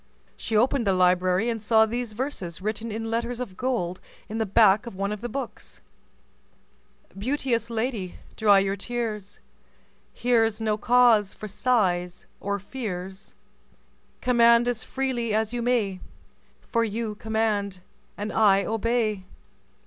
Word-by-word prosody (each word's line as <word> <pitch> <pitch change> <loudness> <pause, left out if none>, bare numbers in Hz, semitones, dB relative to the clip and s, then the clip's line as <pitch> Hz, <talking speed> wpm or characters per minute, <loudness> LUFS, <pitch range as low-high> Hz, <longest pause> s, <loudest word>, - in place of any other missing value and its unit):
She 220 - -1
opened 245 0 +2
the 195 - +4
library 185 +2 +3
and 230 -2 -2
saw 220 +1 +4
these 235 0 -4
verses 210 - -4
written 215 +3 -3
in 225 +1 -4
letters 235 +1 -2
of 225 -7 -5
gold 185 -8 -2 0.3
in 220 +2 -3
the 220 - 0
back 210 +2 +4
of 235 - -7
one 200 +2 -2
of 210 -1 -5
the 240 - -4
books:— 265 +1 -7 1.4
"Beauteous 235 +1 -1
lady, 225 -5 -2 0.2
dry 205 -2 +5
your 195 0 +1
tears, 210 -2 -4 0.7
Here's 225 -3 +1
no 215 -1 0
cause 230 -3 +4
for 215 - -7
sighs 185 -6 0
or 200 0 -2
fears. 195 -3 -7 0.9
Command 235 -1 +5
as 245 -1 -1
freely 245 -5 -2
as 220 +1 0
you 240 - -2
may, 225 -6 0 0.6
For 230 -1 0
you 220 0 -2
command 210 -3 -1 0.4
and 205 +1 -4
I 200 -3 +4
obey." 225 -3 0
220 Hz, 135 wpm, -25 LUFS, 200-235 Hz, 1.4 s, dry